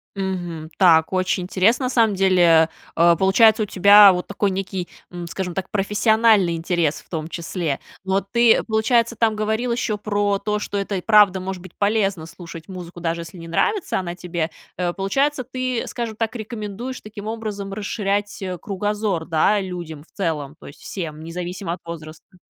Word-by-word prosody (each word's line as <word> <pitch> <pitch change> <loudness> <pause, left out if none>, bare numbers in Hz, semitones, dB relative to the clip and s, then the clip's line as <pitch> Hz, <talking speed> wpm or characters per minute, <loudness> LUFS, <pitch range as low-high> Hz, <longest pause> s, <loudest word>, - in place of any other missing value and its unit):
Мгм. 175 -5 -4
Так, 165 -3 +5
очень 185 0 0
интересно, 200 +8 +2
на - - 0
самом 230 -4 +3
деле, 175 -4 +4 0.3
э, 170 +1 +5
получается 215 +4 +5
у - - -1
тебя 200 +1 +7
вот 180 0 -4
такой 200 0 0
некий, 190 -1 -4 0.2
м, 175 -1 -7
скажем 180 +1 -4
так, 190 -1 -3
профессиональный 210 -2 +3
интерес, 165 -2 -1
в - - -28
том 160 -2 -4
числе. 170 -3 -3 0.2
Но 190 +1 +1
ты, 235 +4 +3
получается, 230 +1 +1
там 220 -1 +1
говорил 220 +3 -1
еще 225 -3 -1
про 205 -1 0
то, 210 +1 -2
что 205 - -4
это 200 0 -2
и - - -4
правда 205 -2 +5
может 185 -1 -5
быть 185 - -12
полезно 200 -5 0
слушать 165 -1 -10
музыку, 175 -2 -8
даже 170 0 -2
если 170 +2 -10
не 165 - -9
нравится 400 - 0
она 175 -2 -4
тебе. 175 -2 -3 0.3
Э, 175 -1 -1
получается, 270 +9 0
ты, 255 -1 -3
скажем 235 -3 -4
так, 225 +2 -2
рекомендуешь 225 +2 -6
таким 210 -1 -9
образом 210 -3 -5
расширять, 205 0 -2
э, 185 -1 -4
кругозор, 205 -3 -2
да, 175 +6 +2
людям 175 -5 -6
в - - -29
целом, 155 -7 -2
то - - -12
есть, 140 - -13
всем, 155 -5 -6
независимо 175 +1 -5
от 180 - -7
возраста. 165 +2 -10
195 Hz, 175 wpm, -22 LUFS, 175-215 Hz, 0.3 s, тебя